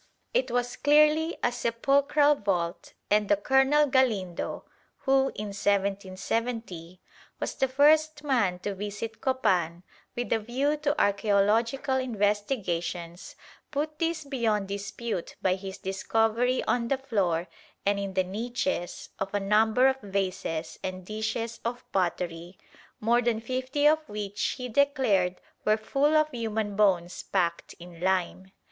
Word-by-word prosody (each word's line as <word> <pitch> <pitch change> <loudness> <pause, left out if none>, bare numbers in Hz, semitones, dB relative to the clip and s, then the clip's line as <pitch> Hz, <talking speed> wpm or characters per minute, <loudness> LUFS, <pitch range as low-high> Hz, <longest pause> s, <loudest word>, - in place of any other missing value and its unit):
It 260 - +1
was 245 0 -1
clearly 305 +3 +4
a 245 - +3
sepulchral 275 +5 +3
vault, 185 -8 -2 0.2
and 210 -1 +3
a 205 - +6
Colonel 265 +7 +3
Galindo, 230 -10 0 0.4
who, 270 0 +3
in 210 0 -4
1770, 200 -1 -2 0.4
was - - -2
the 265 - +1
first 300 +3 +3
man 230 -11 +1
to 205 - -3
visit 205 +3 -6
Copan 185 -10 +1 0.3
with 240 0 -1
a 225 - +2
view 260 +7 0
to 295 -1 0
archæological 220 +5 +2
investigations, 200 -6 -2 0.3
put 305 +1 -3
this 330 -2 -1
beyond 225 -8 -1
dispute 200 0 -4
by 185 - +2
his 190 0 -6
discovery 225 +6 0
on 235 -1 0
the 275 - +1
floor 185 -10 0 0.4
and 200 0 +2
in 195 -1 -4
the 185 - +3
niches 225 +1 -3
of 195 0 -2
a - - +2
number 220 +5 +4
of 265 0 0
vases 190 -5 -3
and 185 -1 -5
dishes 220 +2 -3
of 240 +1 -4
pottery, 175 -1 -2 0.4
more 235 +2 +3
than 235 -2 0
fifty 260 +5 -2
of 310 +1 +5
which 205 -1 -3
he 250 -1 -4
declared 225 -9 +2 0.2
were 215 0 +3
full 280 +7 +1
of 305 0 +2
human 220 -4 -2
bones 185 -4 +2
packed 170 -3 -1
in 170 -1 -12
lime. 190 +1 -1
220 Hz, 135 wpm, -27 LUFS, 190-260 Hz, 0.4 s, a